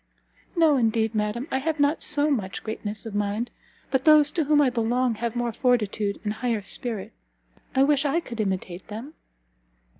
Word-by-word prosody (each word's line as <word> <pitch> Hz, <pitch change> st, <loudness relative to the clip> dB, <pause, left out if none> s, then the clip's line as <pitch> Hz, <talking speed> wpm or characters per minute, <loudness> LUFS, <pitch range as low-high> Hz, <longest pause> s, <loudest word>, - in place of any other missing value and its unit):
"No, 320 Hz, -4 st, +4 dB
indeed, 225 Hz, -2 st, +1 dB
madam! 215 Hz, +5 st, -2 dB
I 265 Hz, -, +1 dB
have 315 Hz, +2 st, -2 dB
not 290 Hz, +2 st, +2 dB
so 290 Hz, +1 st, +3 dB
much 200 Hz, -8 st, -2 dB
greatness 215 Hz, -1 st, -5 dB
of 225 Hz, -, -6 dB
mind. 205 Hz, +3 st, -1 dB, 0.4 s
But 265 Hz, -1 st, +1 dB
those 305 Hz, -1 st, +6 dB
to 325 Hz, -4 st, 0 dB
whom 295 Hz, 0 st, +4 dB
I 275 Hz, -3 st, +4 dB
belong 240 Hz, +1 st, +1 dB
have 230 Hz, +1 st, -3 dB
more 240 Hz, -1 st, -1 dB
fortitude 215 Hz, -5 st, 0 dB
and 210 Hz, -1 st, -1 dB
higher 230 Hz, -2 st, -2 dB
spirit. 220 Hz, 0 st, -4 dB, 0.6 s
I 265 Hz, -, +5 dB
wish 285 Hz, 0 st, +3 dB
I 290 Hz, +3 st, +1 dB
could 235 Hz, -9 st, -8 dB
imitate 190 Hz, -2 st, -3 dB
them!" 230 Hz, +9 st, -8 dB
240 Hz, 175 wpm, -25 LUFS, 215-285 Hz, 0.6 s, those